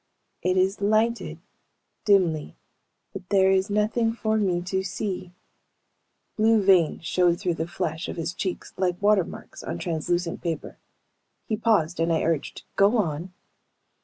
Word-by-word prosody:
"It 185 0 +1
is 190 +2 +1
lighted, 220 +3 +1 0.7
dimly, 175 -7 +2 0.6
but 185 -2 -9
there 190 -1 +4
is 190 +2 +2
nothing 220 +2 +1
for 220 -1 -1
me 185 -5 +1
to 190 +1 -1
see." 185 -1 -4 1.1
Blue 220 +1 +4
veins 180 -4 +3
showed 175 0 +2
through 180 -3 0
the 165 0 -3
flesh 160 0 -3
of - - -5
his 165 +1 -3
cheeks 185 0 -4
like 180 -1 0
watermarks 205 -3 0
on 85 - -5
translucent 165 - -2
paper. 165 -3 -4 0.7
He 220 - -1
paused 210 -7 +1
and 165 +1 +1
I 160 - +1
urged, 165 -3 -2
"Go 200 +5 +4
on." 170 -2 -2
185 Hz, 140 wpm, -25 LUFS, 170-210 Hz, 1.1 s, there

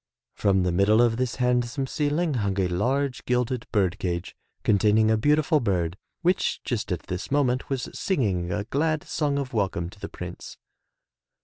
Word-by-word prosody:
From 95 -2 +2
the 90 - +1
middle 100 +5 +4
of 120 -1 +3
this 125 -2 -1
handsome 125 +2 0
ceiling 150 +3 0
hung 100 -5 -1
a 95 - +2
large 125 +9 0
gilded 125 -1 0
bird 100 -3 +1
cage 85 0 -3 0.3
containing 110 +1 +4
a - - +4
beautiful 150 +6 +3
bird, 90 - 0 0.3
which 180 +2 +1
just 115 -4 -2
at 90 - -2
this 90 -1 -5
moment 130 -3 +1
was 135 -3 -2
singing 95 - 0
a 105 +3 -1
glad 155 +7 0
song 145 -3 -1
of 135 -3 -3
welcome 95 -5 -1
to 100 - -16
the - - -6
Prince. - - -8
115 Hz, 170 wpm, -26 LUFS, 100-140 Hz, 0.3 s, middle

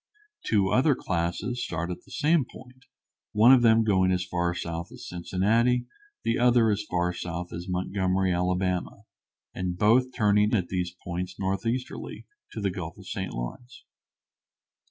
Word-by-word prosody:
Two 100 -3 +3
other 135 +5 +3
classes 85 +8 -2
start 85 +1 -3
at 90 - -8
the - - -20
same 150 0 +2
point, 130 +1 -15 0.5
one 115 +5 +7
of 130 - +6
them 115 -1 +5
going 95 -3 +3
as 90 0 0
far 85 -1 -1
south 85 0 -5
as 125 -1 -10
Cincinnati, 105 +8 +1
and 120 0 -4 0.4
the 115 - 0
other 120 -2 +4
as 105 0 0
far 90 0 0
south 85 0 -5
as 85 +2 -6
Montgomery, 95 +1 0
Ala., 90 0 +1 0.7
and 90 -1 -3
both 120 +6 +4
turning 105 -2 +3
at 90 -5 -1
these 90 -1 -2
points 90 +1 -5
northeasterly 115 +6 -3 0.3
to - - -6
the 100 -2 0
Gulf 85 -3 -6
of - - -13
St. - - -4
Lawrence. - - -7
95 Hz, 155 wpm, -27 LUFS, 90-120 Hz, 0.7 s, one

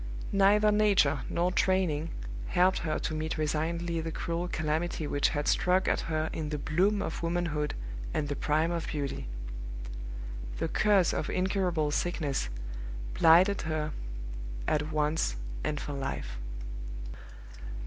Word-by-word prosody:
Neither 205 +2 +5
nature 200 -9 +4
nor 175 +2 +1
training 180 -5 +2 0.4
helped 185 +1 +4
her 155 -2 -1
to - - -2
meet 155 +1 -2
resignedly 165 +2 0
the 165 0 -3
cruel 170 +2 -2
calamity 155 0 -1
which 145 -1 +2
had 145 -1 -1
struck 180 +3 +3
at - - +3
her 155 0 +1
in 155 -2 -3
the 150 - -1
bloom 185 +8 +2
of - - -4
womanhood 165 -3 0 0.4
and 150 - 0
the 145 - -2
prime 155 +4 +1
of 170 -1 -2
beauty. 140 - -3 1.3
The - - -1
curse 200 -5 +4
of - - -1
incurable 185 -5 +1
sickness 145 - 0 0.6
blighted 175 - +6
her 155 -1 -1 0.8
at 150 0 +1
once 150 - +1 0.3
and 150 - -1
for 145 - -4
life. 100 - -4
160 Hz, 130 wpm, -30 LUFS, 150-180 Hz, 1.3 s, blighted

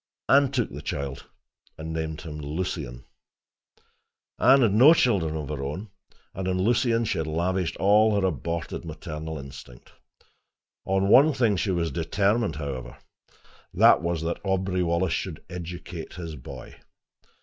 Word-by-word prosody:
Anne 140 0 +5
took 125 -4 -1
the - - -7
child, 70 -1 -5 0.5
and 80 +1 -6
named 80 -1 -4
him 75 -2 -7
Lucien. 75 -5 -4 1.4
Anne 135 +2 +6
had 115 -5 +4
had - - -1
no 135 +10 +7
children 85 - +1
of 75 -3 -5
her 75 -2 -4
own, 85 +10 -5 0.4
and 95 0 -4
on 90 0 0
Lucien 115 +3 +2
she - - -1
had 80 - -2
lavished 85 +3 -1
all 105 +1 +4
her 95 - +1
aborted 85 0 -3
maternal 80 0 -6
instinct. 65 -3 -11 0.9
On 95 0 +1
one 140 +9 +6
thing 120 -6 +2
she 95 - -1
was 85 -3 0
determined, 100 +3 0
however: 65 -5 -6 0.8
that - - +6
was 85 -1 -2
that 85 +1 -3
Aubrey 95 -1 0
Wallace 85 0 +1
should 85 -4 -4
educate 85 -1 -7
his 85 -3 -6
boy. 65 -1 -10
85 Hz, 150 wpm, -26 LUFS, 80-100 Hz, 1.4 s, no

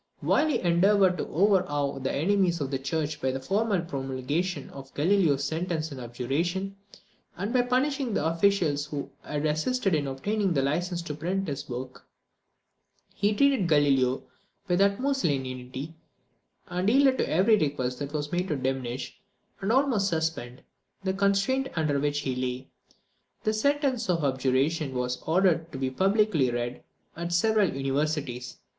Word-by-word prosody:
While 310 - +3
he 305 - +1
endeavoured 185 +1 +3
to - - -2
overawe 155 -7 +1
the 135 0 -2
enemies 180 +2 +1
of 140 -2 -3
the 135 - -1
church 150 +2 -2
by 130 - +1
the 130 +1 -2
formal 200 +7 0
promulgation 145 +2 -3
of 135 -1 -10
Galileo's 155 -3 +2
sentence 160 +1 -2
and 135 -2 -7
abjuration, 165 +11 -2 0.6
and 200 +6 -3
by 250 - +4
punishing 255 -1 0
the 150 - 0
officials 165 -4 +2
who 145 -2 -5
had 150 0 -3
assisted 190 +7 0
in 145 -3 +1
obtaining 190 +9 -1
the 135 -3 +1
license 170 +5 -1
to 155 - -5
print 180 +6 -2
his 145 -1 -5
work, 125 +1 -7 1.1
he 205 +1 +1
treated 270 -6 +3
Galileo 135 -4 +3 0.4
with 180 0 +2
the 200 - +6
utmost 270 +7 -1
lenity, 130 0 -3 0.7
and 180 +3 0
yielded 265 +1 +4
to - - 0
every 195 +7 +4
request 135 -8 -1
that 145 -1 -4
was 150 -1 -3
made 180 +1 0
to 155 - -1
diminish, 130 -1 -3 0.4
and 195 +2 -1
almost 250 -6 +2
suspend, 160 -7 -3 0.4
the 190 -1 0
constraint 200 +7 +1
under 155 -4 +1
which 145 0 0
he 130 -3 -2
lay. 125 0 -3 0.8
The 215 - +1
sentence 265 -1 +1
of 165 -3 +1
abjuration 135 +2 +1
was 125 0 -2
ordered 170 -1 +2
to - - -6
be 130 -1 -1
publicly 195 - +2
read 120 +1 -3 0.3
at 170 +1 -4
several 210 +2 +3
universities. 135 -2 -2
160 Hz, 155 wpm, -27 LUFS, 135-195 Hz, 1.1 s, the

